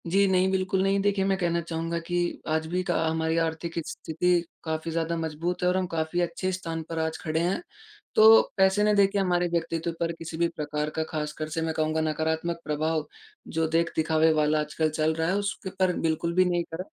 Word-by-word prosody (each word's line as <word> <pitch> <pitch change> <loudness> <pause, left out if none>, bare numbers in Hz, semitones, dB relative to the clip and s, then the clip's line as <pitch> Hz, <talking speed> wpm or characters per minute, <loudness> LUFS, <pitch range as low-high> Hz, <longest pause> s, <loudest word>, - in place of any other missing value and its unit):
जी 195 +4 +3
नहीं, 190 0 +3
बिल्कुल 190 0 +1
नहीं। 195 0 +2
देखिए 200 -1 +1
मैं 195 0 +1
कहना 170 -2 0
चाहूँगा 165 0 -3
कि 175 0 -1
आज 160 0 0
भी 180 +3 -1
क - - +4
हमारी 160 0 0
आर्थिक 165 0 -1
स्थिति 175 +2 0 0.2
काफ़ी 160 0 -3
ज़्यादा 165 +1 -1
मजबूत 165 +3 -3
है - - +3
और 180 - +1
हम 185 -1 0
काफ़ी 165 +1 -1
अच्छे 175 +2 -1
स्थान 165 -3 -4
पर 165 -1 -3
आज 160 0 -1
खड़े 160 -1 0
हैं। 175 - 0 0.5
तो 220 +1 +9 0.2
पैसे 190 +2 +4
ने 210 0 +4
देखिए 200 -1 +4
के 200 - 0
हमारे 180 -2 +1
व्यक्तित्व 165 0 -1
पर 170 0 0
किसी 165 0 -6
भी 170 0 +2
प्रकार 150 0 -2
का 160 - 0
ख़ासकर 155 0 -3
से 165 +1 -2
मैं 160 0 -1
कहूँगा 155 0 0
नकारात्मक 160 +2 -1
प्रभाव 155 0 -1 0.4
जो 160 0 0
देख-दिखावे 160 -1 +2
वाला 155 0 +2
आजकल 150 +1 0
चल 155 +1 0
रहा 160 0 0
है 185 - +1
उसके 205 -1 -3
पर 185 -1 +3
बिल्कुल 165 +1 0
भी 185 0 +5
नहीं 175 -1 +1
करा। 175 +3 -3
165 Hz, 210 wpm, -27 LUFS, 160-180 Hz, 0.5 s, तो